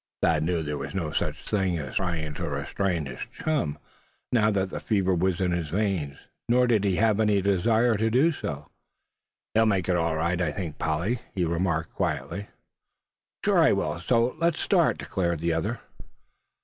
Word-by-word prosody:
Thad 80 -2 +3
knew 85 +1 0
there 75 -1 -3
was 70 +5 -6
no 85 -5 -2
such - - -2
thing 95 -4 0
as 70 -5 -6
trying 85 -5 -2
to - - -4
restrain 90 -6 -1
his 65 - -8
chum, 140 - -1 0.5
now 110 -3 +4
that 95 -2 0
the - - -4
fever 95 -4 +1
was 90 +1 +1
in 90 -2 +1
his 85 -3 -2
veins; 90 -7 -1 0.3
nor 125 +1 +5
did 115 -5 +2
he 95 -2 +2
have 110 +1 +2
any 105 -2 +3
desire 110 +5 +2
to 110 +2 +1
do 135 +9 +4
so. 75 - -6 0.8
"He'll 110 0 +4
make 95 -5 +1
it, 90 - +2
all 85 -2 +1
right, 85 +3 0
I 80 -4 +1
think, 85 -6 -5
Polly," 85 +10 0 0.2
he 90 -3 +1
remarked, 85 -1 -1
quietly. 100 +1 -2 1.0
"Sure - - +4
I - - +5
will; 75 +2 -1
so 115 +6 +1
let's 170 -1 +1
start," - - +3
declared 85 -4 -1
the 85 +1 0
other. 105 +9 -2
90 Hz, 180 wpm, -26 LUFS, 80-110 Hz, 1.0 s, nor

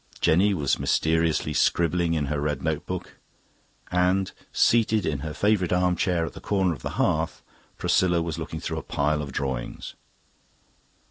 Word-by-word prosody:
Jenny 95 +5 +3
was 70 -5 0
mysteriously 80 -1 +1
scribbling 85 +2 +2
in 75 -2 0
her 75 +1 -2
red 75 0 -2
notebook. 80 +3 -3 0.7
And, 90 +2 +2 0.2
seated 110 -4 +3
in 75 -3 -1
her 75 +2 -5
favourite 100 0 +1
arm 90 0 +2
chair 85 -1 0
at - - -7
the - - -10
corner 95 -4 +1
of 65 - -10
the - - -5
hearth, - - 0 0.3
Priscilla 85 -2 +2
was 85 -2 -3
looking - - -5
through - - -3
a - - -7
pile 75 +1 0
of 70 -2 -6
drawings. 65 -3 -4
85 Hz, 155 wpm, -25 LUFS, 75-90 Hz, 0.7 s, Jenny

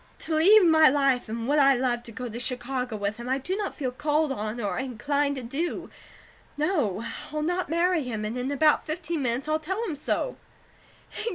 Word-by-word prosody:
To 320 - -3
leave 375 +6 +6
my 315 -2 +7
life 270 -4 +1
and 230 +1 -4
what 295 +2 +3
I 275 -1 +6
love 245 -1 0
to 235 - -6
go 250 +2 -5
to 235 +1 -6
Chicago 250 -1 -3
with 205 +1 -2
him, 240 +1 -6
I 260 - +2
do 360 +8 -3
not 410 -1 -3
feel 260 -4 -2
called 295 +2 0
on, 215 -1 -3
or 205 0 -2
inclined 280 +3 -1
to 260 - -5
do. 285 +9 -3 0.7
No, 285 - 0 0.3
I'll 305 0 -2
not 355 +2 -1
marry 340 +1 +2
him, 225 -5 -4
and 215 +3 -3
in 250 +1 -2
about 300 +2 +3
fifteen 325 0 -3
minutes 250 +2 -1
I'll 310 0 +1
tell 380 +8 -3
him 340 -8 -3
so." 300 - -2
275 Hz, 200 wpm, -26 LUFS, 245-315 Hz, 0.7 s, my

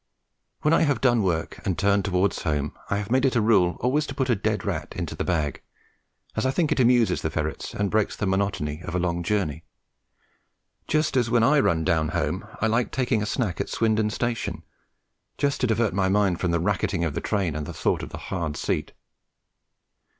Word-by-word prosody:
When 150 - +4
I - - +4
have 145 -7 +2
done 120 -3 +3
work 85 -5 -1
and 90 -4 -1
turned 100 +3 +2
towards 95 -1 +1
home, 75 -2 -1
I 100 - +1
have 105 +1 -4
made 130 0 +3
it 135 -2 +2
a - - +4
rule 100 -5 +3
always 145 +5 +1
to 135 - -6
put 130 -3 0
a - - +4
dead 105 -1 -1
rat - - -3
into - - -4
the - - -3
bag, 80 -6 -1 0.7
as 110 - 0
I 130 - +2
think 155 +3 +1
it - - +1
amuses 120 -6 +4
the 80 - -1
ferrets 80 -1 -4
and 100 -1 -1
breaks 110 -1 +1
the - - -2
monotony 95 -6 -1
of 85 -1 -5
a - - +1
long 85 -1 -1
journey; 85 -4 -1 1.2
just 155 -2 +1
as 120 -3 +2
when 120 -1 +3
I 145 +5 +5
run 80 -11 +2
down 80 -1 +2
home - - -2
I - - +1
like 115 +2 +1
taking 125 -4 0
a 105 - -2
snack 105 -5 -1
at - - -4
Swindon 110 -1 +1
Station, 120 +1 -3 0.7
just 140 -1 0
to 125 - +3
divert 110 -2 +1
my 95 0 +1
mind 95 -3 +2
from 90 - 0
the 85 0 +1
racketing 85 0 0
of 80 -3 -1
the - - -3
train 95 -7 0
and 75 -1 -4
the - - -5
thought - - 0
of - - -6
the - - -7
hard 80 -5 -4
seat. - - -2
100 Hz, 215 wpm, -25 LUFS, 85-120 Hz, 1.2 s, I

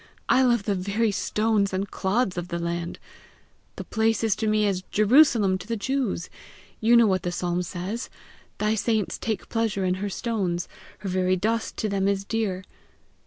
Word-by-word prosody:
I 260 - +4
love 240 -4 +3
the 205 - 0
very 200 +4 0
stones 205 +1 0
and 190 +1 -2
clods 195 +1 0
of 175 -1 -4
the 170 -1 -3
land! 170 0 -3 0.8
The - - -6
place 225 0 0
is 220 -3 +2
to 220 - -1
me 215 0 +3
as 195 -3 0
Jerusalem 215 -4 +4
to - - -10
the 230 0 -2
Jews: 250 -7 -1 0.5
you 235 +2 +5
know 235 - +6
what 190 -3 +2
the 175 - -2
psalm 175 0 -1
says: 185 +6 -5 0.5
Thy 210 +1 +1
saints 220 -2 0
take 220 -2 -3
pleasure 220 -4 -1
in 180 - +2
her 205 - -1
stones, 190 -5 -2 0.3
Her 195 - -4
very 185 0 +2
dust 220 +4 -1
to 215 - -1
them 195 -1 0
is 200 0 0
dear!" 200 -4 -2
200 Hz, 180 wpm, -25 LUFS, 185-225 Hz, 0.8 s, know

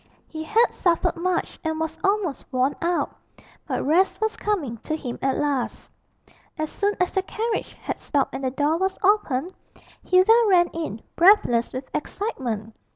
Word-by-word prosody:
He 315 - -7
had 450 +8 +3
suffered 345 -3 +1
much 355 +1 -2
and 320 -1 -2
was 320 0 -2
almost 390 -7 0
worn 260 +2 +1
out; 345 0 0 0.5
but - - -2
rest 345 +7 +3
was 440 0 0
coming 320 - -2
to 310 +8 -4
him 250 -6 -6
at 270 -1 +1
last. 280 -4 -2 0.7
As 310 0 -3
soon 410 0 0
as 360 - +1
the 385 - +1
carriage 440 +3 -3
had - - -5
stopped 280 -2 0
and 270 - -5
the 260 - +1
door 290 +5 +1
was 380 +2 -1
opened, 370 -5 +2 0.5
Hilda 370 +4 +5 0.2
ran 350 -2 +5
in, 310 -10 -5
breathless 335 - +5
with 260 +1 -6
excitement. 245 - -3
330 Hz, 160 wpm, -24 LUFS, 270-385 Hz, 0.7 s, Hilda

